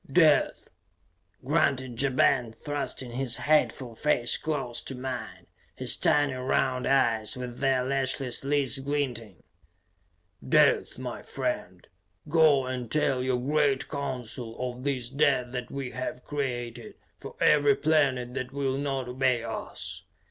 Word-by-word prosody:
"Death!" 155 Hz, -1 st, +3 dB, 0.8 s
grunted 130 Hz, -3 st, +1 dB
Ja 140 Hz, -, +3 dB
Ben, 125 Hz, -2 st, +2 dB
thrusting 140 Hz, 0 st, -4 dB
his 125 Hz, 0 st, 0 dB
hateful 140 Hz, -5 st, +1 dB
face 120 Hz, -1 st, +2 dB
close 135 Hz, -6 st, -2 dB
to 135 Hz, -, -5 dB
mine, 125 Hz, -3 st, -6 dB, 0.3 s
his -, -, 0 dB
tiny 145 Hz, -2 st, +2 dB
round 130 Hz, 0 st, 0 dB
eyes, 115 Hz, -3 st, +2 dB
with 125 Hz, -1 st, -6 dB
their 135 Hz, -2 st, +2 dB
lashless 135 Hz, -1 st, 0 dB
lids 140 Hz, -1 st, +3 dB
glinting. 130 Hz, -, -3 dB, 1.1 s
"Death, -, -, +3 dB
my -, -, -6 dB
friend. 90 Hz, 0 st, -4 dB, 0.4 s
Go 150 Hz, -4 st, +4 dB
and 125 Hz, -3 st, -5 dB
tell 135 Hz, -4 st, +2 dB
your 130 Hz, -1 st, 0 dB
great 140 Hz, +1 st, +1 dB
Council 125 Hz, -4 st, -4 dB
of 125 Hz, 0 st, -5 dB
this 135 Hz, -4 st, -1 dB
death 135 Hz, -3 st, +2 dB
that 125 Hz, -1 st, -5 dB
we 135 Hz, -2 st, -5 dB
have 130 Hz, -1 st, -5 dB
created 120 Hz, -5 st, -4 dB, 0.2 s
for -, -, -9 dB
every 145 Hz, -2 st, +5 dB
planet 135 Hz, -5 st, +1 dB
that 130 Hz, -1 st, -4 dB
will 135 Hz, -1 st, -1 dB
not 135 Hz, -3 st, -2 dB
obey 125 Hz, -1 st, +1 dB
us. 115 Hz, -1 st, -5 dB
130 Hz, 130 wpm, -27 LUFS, 125-140 Hz, 1.1 s, every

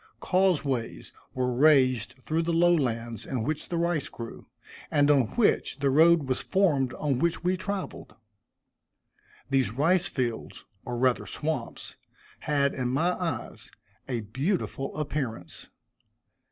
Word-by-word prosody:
Causeways 155 Hz, -11 st, 0 dB, 0.2 s
were 125 Hz, -1 st, 0 dB
raised 130 Hz, -4 st, +3 dB
through 160 Hz, +1 st, 0 dB
the 170 Hz, +1 st, -1 dB
low 175 Hz, +1 st, +4 dB
lands 115 Hz, -, -2 dB
in 125 Hz, -4 st, -3 dB
which 150 Hz, +5 st, -3 dB
the 170 Hz, -, -2 dB
rice 170 Hz, -3 st, 0 dB
grew, 115 Hz, -1 st, -9 dB, 0.4 s
and 145 Hz, 0 st, +3 dB
on 135 Hz, -5 st, +3 dB
which 235 Hz, -, +2 dB
the 140 Hz, -1 st, +1 dB
road 160 Hz, +2 st, +5 dB
was 130 Hz, -1 st, 0 dB
formed 150 Hz, -10 st, +1 dB
on 140 Hz, -4 st, -1 dB
which 170 Hz, +2 st, 0 dB
we 180 Hz, +1 st, +2 dB
traveled. 190 Hz, +1 st, -5 dB, 1.4 s
These 135 Hz, -5 st, +2 dB
rice 165 Hz, -, +2 dB
fields, 120 Hz, -4 st, -4 dB, 0.2 s
or 120 Hz, -1 st, -4 dB
rather 125 Hz, 0 st, +1 dB
swamps, 150 Hz, -6 st, -4 dB, 0.4 s
had, 140 Hz, -2 st, +1 dB
in 130 Hz, -2 st, -2 dB
my 150 Hz, +8 st, +1 dB
eyes, 175 Hz, -3 st, -5 dB, 0.4 s
a 120 Hz, -3 st, -1 dB
beautiful 135 Hz, -, -3 dB
appearance. 135 Hz, -, -4 dB
140 Hz, 130 wpm, -27 LUFS, 125-170 Hz, 1.4 s, road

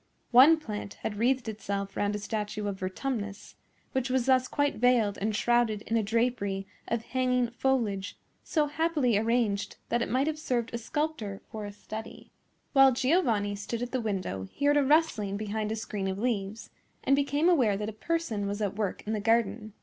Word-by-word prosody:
One 270 Hz, +7 st, +8 dB
plant 210 Hz, -9 st, -6 dB
had 205 Hz, -1 st, -3 dB
wreathed 250 Hz, +1 st, +2 dB
itself 200 Hz, -2 st, -4 dB
round 205 Hz, 0 st, 0 dB
a -, -, -1 dB
statue 210 Hz, 0 st, -3 dB
of 195 Hz, -1 st, -4 dB
Vertumnus, 205 Hz, +2 st, -4 dB, 0.4 s
which 260 Hz, -1 st, -1 dB
was 255 Hz, -1 st, +1 dB
thus 260 Hz, -1 st, +4 dB
quite 285 Hz, +1 st, 0 dB
veiled 235 Hz, -4 st, +3 dB
and 215 Hz, +1 st, -1 dB
shrouded 230 Hz, -2 st, +2 dB
in 225 Hz, -, -2 dB
a 225 Hz, -, +3 dB
drapery 215 Hz, -3 st, 0 dB, 0.2 s
of 230 Hz, -1 st, -1 dB
hanging 250 Hz, -1 st, 0 dB
foliage, 230 Hz, -7 st, -1 dB, 0.3 s
so 305 Hz, -3 st, +1 dB
happily 295 Hz, -5 st, +1 dB
arranged 220 Hz, -2 st, +1 dB
that 235 Hz, +1 st, +1 dB
it -, -, -1 dB
might 260 Hz, +3 st, +2 dB
have 310 Hz, 0 st, -2 dB
served 245 Hz, -7 st, -1 dB
a 235 Hz, -, -2 dB
sculptor 235 Hz, -6 st, -3 dB
for 215 Hz, -1 st, -5 dB
a 205 Hz, -, -6 dB
study. 215 Hz, +2 st, -9 dB, 0.4 s
While 270 Hz, -1 st, +7 dB
Giovanni 240 Hz, -, +1 dB
stood 225 Hz, +4 st, -4 dB
at 245 Hz, -, -5 dB
the 255 Hz, -, -1 dB
window 185 Hz, -, -3 dB
he 285 Hz, -, -3 dB
heard 290 Hz, 0 st, +5 dB
a 290 Hz, -, +4 dB
rustling 265 Hz, -9 st, +2 dB
behind 215 Hz, 0 st, -2 dB
a -, -, -1 dB
screen 210 Hz, -3 st, -4 dB
of 190 Hz, 0 st, -2 dB
leaves, 215 Hz, -2 st, -2 dB, 0.3 s
and 275 Hz, -, +4 dB
became 285 Hz, +3 st, +1 dB
aware 250 Hz, -, +4 dB
that 210 Hz, +1 st, -3 dB
a 220 Hz, -, -4 dB
person 225 Hz, -5 st, -2 dB
was 205 Hz, +1 st, -3 dB
at 205 Hz, -2 st, -1 dB
work 210 Hz, -3 st, -2 dB
in 215 Hz, -, -2 dB
the 215 Hz, -, -1 dB
garden. 215 Hz, -1 st, +1 dB
225 Hz, 190 wpm, -29 LUFS, 205-260 Hz, 0.4 s, One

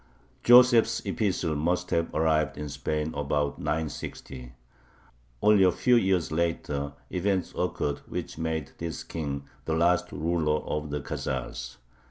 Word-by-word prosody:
Joseph's 120 Hz, -2 st, +6 dB
epistle 90 Hz, -7 st, 0 dB
must 90 Hz, +4 st, -1 dB
have 85 Hz, 0 st, +1 dB
arrived 80 Hz, -2 st, +2 dB
in 75 Hz, 0 st, -5 dB
Spain 75 Hz, +2 st, -2 dB
about 75 Hz, 0 st, -1 dB
960. 70 Hz, -4 st, -4 dB, 0.9 s
Only 105 Hz, -2 st, +6 dB
a 90 Hz, -, +5 dB
few 125 Hz, +7 st, +3 dB
years 95 Hz, -8 st, +2 dB
later 75 Hz, -4 st, -1 dB, 0.2 s
events 95 Hz, 0 st, 0 dB
occurred 70 Hz, -1 st, -1 dB
which -, -, -5 dB
made 80 Hz, -3 st, -3 dB
this 85 Hz, -1 st, -4 dB
King 70 Hz, -4 st, -4 dB, 0.2 s
the 80 Hz, -, 0 dB
last 90 Hz, +2 st, +2 dB
ruler 75 Hz, 0 st, 0 dB
of 75 Hz, 0 st, -3 dB
the 75 Hz, 0 st, -3 dB
Khazars. 60 Hz, -2 st, -4 dB
80 Hz, 130 wpm, -27 LUFS, 75-90 Hz, 0.9 s, Joseph's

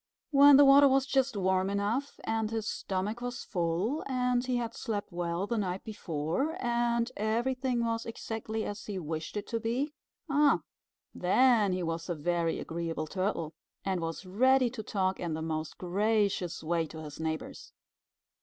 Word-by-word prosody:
When 285 Hz, -1 st, +8 dB
the 285 Hz, -, +8 dB
water 280 Hz, +1 st, +8 dB
was 270 Hz, 0 st, +3 dB
just 270 Hz, -4 st, +1 dB
warm 190 Hz, 0 st, +1 dB
enough, 205 Hz, +8 st, -1 dB
and 225 Hz, -1 st, -1 dB
his 220 Hz, -1 st, -3 dB
stomach 200 Hz, +5 st, -3 dB
was 245 Hz, 0 st, -4 dB
full, 180 Hz, -, -1 dB
and 250 Hz, -2 st, +1 dB
he 255 Hz, -1 st, -1 dB
had 235 Hz, -1 st, -3 dB
slept 205 Hz, -4 st, -4 dB
well 175 Hz, +1 st, -2 dB
the 230 Hz, +1 st, -1 dB
night 185 Hz, -2 st, -2 dB
before, 205 Hz, -, -2 dB
and 235 Hz, 0 st, +1 dB
everything 240 Hz, +3 st, 0 dB
was 230 Hz, 0 st, -2 dB
exactly 220 Hz, -1 st, -4 dB
as 205 Hz, 0 st, -6 dB
he 205 Hz, -2 st, -4 dB
wished 160 Hz, +2 st, -4 dB
it 205 Hz, -, -3 dB
to 230 Hz, -, -1 dB
be, 250 Hz, +6 st, -1 dB, 0.3 s
ah, 290 Hz, 0 st, +4 dB, 0.5 s
then 215 Hz, +2 st, +4 dB
he 180 Hz, -1 st, -1 dB
was 165 Hz, +1 st, -3 dB
a 175 Hz, -, 0 dB
very 165 Hz, +1 st, 0 dB
agreeable 165 Hz, -1 st, -3 dB
Turtle, 185 Hz, -2 st, -2 dB, 0.3 s
and 190 Hz, -3 st, 0 dB
was 165 Hz, +3 st, -4 dB
ready 255 Hz, +6 st, +3 dB
to 235 Hz, -3 st, -5 dB
talk 190 Hz, -3 st, -1 dB
in 170 Hz, -3 st, -2 dB
the 160 Hz, -, -4 dB
most 155 Hz, -1 st, -3 dB
gracious 195 Hz, -2 st, 0 dB
way 165 Hz, 0 st, 0 dB
to 160 Hz, 0 st, -9 dB
his 150 Hz, 0 st, -9 dB
neighbors. 160 Hz, -1 st, -4 dB
210 Hz, 165 wpm, -30 LUFS, 175-245 Hz, 0.5 s, When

